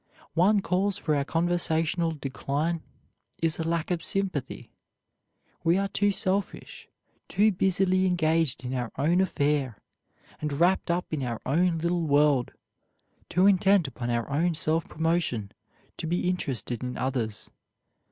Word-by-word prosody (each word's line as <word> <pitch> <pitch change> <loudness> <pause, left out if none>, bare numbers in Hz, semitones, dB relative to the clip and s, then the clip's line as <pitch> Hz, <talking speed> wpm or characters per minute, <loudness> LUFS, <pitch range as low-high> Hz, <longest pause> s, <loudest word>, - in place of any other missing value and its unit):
One 195 +6 +4
cause 195 +2 0
for 155 -2 0
our 140 - +1
conversational 165 +1 +1
decline 150 +3 -2 0.6
is 165 -1 0
a - - 0
lack 165 +1 -1
of 175 -2 -1
sympathy. 190 -9 -3 0.9
We 170 +2 +3
are 195 0 0
too 205 +1 +1
selfish, 195 0 -2 0.4
too 215 +2 +3
busily 185 0 +2
engaged 160 -6 +1
in 125 - -3
our 125 -3 -3
own 160 +6 +2
welfare, 145 - 0 0.6
and 150 -1 -3
wrapped 175 +6 +2
up 170 -1 -1
in 150 - -1
our 120 -3 -3
own 165 +5 +2
little 170 +2 0
world, 145 -3 +3 0.8
too 180 +2 +3
intent 195 -3 +4
upon 120 -2 -5
our 120 -1 -1
own 165 +4 0
self 160 +1 0
promotion 160 - -1 0.5
to 160 - -4
be 175 +2 0
interested 130 -9 -2
in 125 0 -4
others. 120 -5 -3
165 Hz, 140 wpm, -27 LUFS, 140-180 Hz, 0.9 s, One